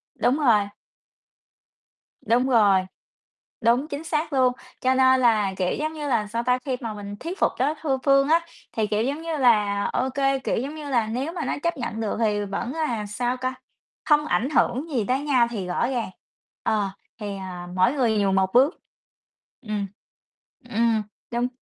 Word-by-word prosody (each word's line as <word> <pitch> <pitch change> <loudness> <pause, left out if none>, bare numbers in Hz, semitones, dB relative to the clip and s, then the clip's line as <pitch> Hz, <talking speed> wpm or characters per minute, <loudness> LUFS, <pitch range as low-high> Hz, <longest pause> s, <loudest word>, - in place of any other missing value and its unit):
Đúng 250 +3 +2
rồi. 220 -8 +3 1.6
Đúng 245 +3 +3
rồi. 205 -6 +5 0.8
Đúng, 240 +6 +3
chính 285 0 -5
xác 310 -1 -2
luôn. 255 -2 +3 0.3
Cho 260 0 +3
nên 260 0 +5
là, 215 -6 +3
kiểu, 180 -1 0
giống 310 +1 -2
như 300 -2 -5
là 230 -6 +1
sao 230 +3 -2
ta, 250 +1 +2
khi 260 -3 -1
mà 225 -3 -4
mình 205 -1 -7
thuyết 350 +5 -6
phục - - +3
đối 280 +4 +2
thư 275 -4 0
phương 275 -1 +4
á, 330 +1 +5 0.3
thì, 220 -2 0
kiểu, 210 +1 0
giống 280 +5 -2
như 330 -1 -3
là, 210 -6 +3
ô 260 +1 0
kê, 270 0 +1
kiểu, 265 - -1
giống 275 +6 -3
như 300 -2 -7
là, 235 -5 +1
nếu 260 +9 -3
mà 355 - -3
nó - - -1
chấp 340 -2 0
nhận 235 -3 -4
được 215 - -1
thì 210 -2 +1
vẫn 220 +6 -4
là, 250 -10 -2
sao 245 +5 -2
ca, 255 0 -2 0.5
không 300 -1 +4
ảnh 265 -4 0
hưởng 290 +1 +1
gì 245 -8 0
tới 255 +2 +1
nhau 265 -5 +3
thì 205 -6 -4
rõ 180 +6 0
ràng 245 -5 -2 0.5
ờ, 210 -3 +1 0.3
thì, 205 -2 -4
ờ, 180 -2 -7
mỗi 185 +8 +3
người 240 -6 +1
nhường 195 -1 +2
một 190 0 +1
bước. 270 +7 +4 0.8
Ừm. 210 -4 -3 0.8
Ừm. 230 -1 +2 0.3
Đúng. 240 +1 0
245 Hz, 190 wpm, -24 LUFS, 210-275 Hz, 1.6 s, rồi